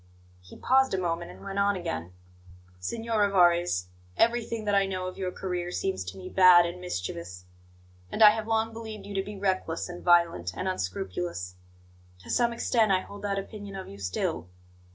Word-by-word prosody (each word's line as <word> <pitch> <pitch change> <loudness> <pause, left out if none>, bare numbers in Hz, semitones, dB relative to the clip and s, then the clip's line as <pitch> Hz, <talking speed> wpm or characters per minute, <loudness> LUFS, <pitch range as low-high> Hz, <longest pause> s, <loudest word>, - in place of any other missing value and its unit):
He 90 - -14
paused 265 -4 +3
a - - -1
moment, 170 -1 -2
and - - -12
went 195 0 -3
on 200 0 +3
again: 90 - -4 0.7
"Signor 225 - -2
Rivarez, 175 - +3 0.3
everything 230 -1 +1
that 205 - +1
I 200 -1 +3
know 185 -1 -3
of 185 - -5
your 185 -1 -2
career 180 -2 -3
seems 190 - -2
to 90 +1 -7
me 95 - -8
bad 180 -2 +7
and 175 +1 -5
mischievous; 90 - -5 0.7
and - - +3
I 210 - +11
have 220 0 -4
long 225 0 0
believed 220 -2 -8
you 205 - -7
to 195 - 0
be 205 +1 -8
reckless 185 -4 -1
and 175 0 -8
violent 170 - +3
and - - -2
unscrupulous. 90 -1 -3 0.7
To - - -8
some 240 -1 +2
extent 230 -2 +2
I 185 -1 +3
hold 200 +1 -11
that 200 -1 -1
opinion 200 0 -7
of 190 - -6
you 100 - -11
still. 90 -2 -2
185 Hz, 185 wpm, -28 LUFS, -, 0.7 s, I